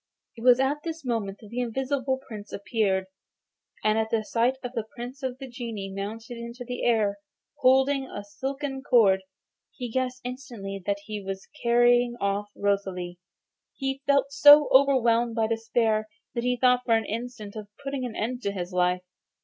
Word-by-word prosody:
It 230 - -11
was 250 0 +7
at 280 +3 +1
this 325 -2 -6
moment 215 -5 -2
that 215 - -12
the 235 +3 -4
Invisible 265 +2 -1
Prince 210 -3 -8
appeared, 200 -3 0 0.8
and 215 +1 +3
at 220 0 0
the 220 -1 +1
sight 235 +5 +1
of 245 - -4
the 225 -3 -3
Prince 250 +3 -7
of 260 -1 -3
the 270 0 -8
Genii 230 -6 -6
mounting 225 +4 -6
into 235 +1 -7
the 245 +1 -4
air, 210 -4 +2 0.4
holding 265 +1 +4
a 205 - -7
silken 270 +5 -4
cord, 210 -8 +4 0.5
he 245 -4 -7
guessed 255 0 -1
instantly 235 -6 -6
that 200 0 0
he 210 -1 -5
was 195 0 -6
carrying 240 0 +4
off 200 +1 -1
Rosalie. 190 -3 -1 0.6
He 270 0 -3
felt 280 -1 +3
so 290 +1 +8
overwhelmed 240 -4 +4
by 225 -2 +2
despair 225 -1 +1 0.3
that 235 - -2
he 250 0 +1
thought 250 0 +4
for 230 -2 +3
an 225 -1 +1
instant 225 -2 -5
of 215 -1 -7 0.2
putting 275 -1 -3
an 245 -3 -4
end 245 +3 -2
to 200 - -1
his 180 -2 -5
life. 180 0 +2
235 Hz, 175 wpm, -27 LUFS, 205-260 Hz, 0.8 s, so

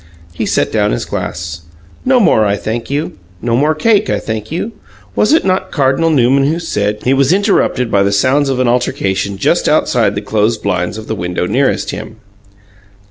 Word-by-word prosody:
He - - -3
set - - 0
down - - +1
his - - -2
glass. 85 -1 -5 0.4
"No 255 -1 +4
more, 145 - +4
I 100 -1 +1
thank 115 +3 -4
you. 140 -7 -3 0.2
No 115 +4 -1
more 150 +5 +2
cake, 210 +4 +2
I - - +1
thank 110 +1 -5
you. 180 +7 -3 0.4
Was 210 - +2
it 320 - +3
not 190 0 0
Cardinal 140 +3 +1
Newman 135 -2 +3
who 165 - -1
said 105 -11 -2
" - - -16
He 130 - +2
was 135 +1 +3
interrupted 190 - +1
by 100 - +3
the 100 0 +2
sounds 130 +8 +2
of 130 -1 -1
an 130 - +2
altercation 100 -5 -1
just - - +1
outside 100 - +2
the 100 - -2
closed 110 +1 0
blinds 95 -1 -1
of 110 - -8
the 110 - -3
window 90 -3 -2
nearest 130 +8 0
him. - - -7
120 Hz, 195 wpm, -14 LUFS, 100-150 Hz, 0.4 s, No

